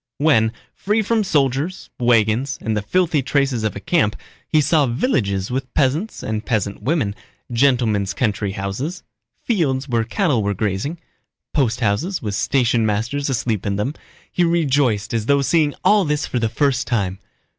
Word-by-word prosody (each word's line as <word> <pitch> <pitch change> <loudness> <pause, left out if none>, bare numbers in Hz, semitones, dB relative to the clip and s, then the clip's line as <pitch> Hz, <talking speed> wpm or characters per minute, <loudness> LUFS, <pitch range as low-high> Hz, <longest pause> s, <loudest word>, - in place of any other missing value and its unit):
When—free 150 - +1
from 220 +1 +1
soldiers, 145 +1 0
wagons, 120 +3 +2
and 110 -1 -2
the 105 - 0
filthy 165 - +1
traces 135 -3 0
of 110 - -1
a - - -4
camp—he 145 - -1
saw 150 -1 +3
villages 115 - 0
with 130 0 -3
peasants 150 +11 0
and 110 0 -3
peasant 105 -4 -1
women, 135 -9 0 0.4
gentlemen's 115 -6 +2
country 105 -4 -1
houses, 115 - -4 0.4
fields 140 - 0
where 120 -3 +1
cattle 135 - +1
were 100 0 -1
grazing, 105 - -2 0.6
posthouses 130 - 0
with 105 -3 -4
stationmasters 120 +3 +1
asleep 115 -5 -1
in 100 -1 -1
them, 105 +8 -1 0.4
he 175 - +1
rejoiced 140 -11 +1
as 115 -1 -1
though 140 -1 +3
seeing 150 0 +2
all 210 -1 +5
this 150 -3 0
for 125 - -2
the 115 -1 0
first 135 0 0
time. 95 -5 -1
125 Hz, 145 wpm, -20 LUFS, 110-150 Hz, 0.6 s, all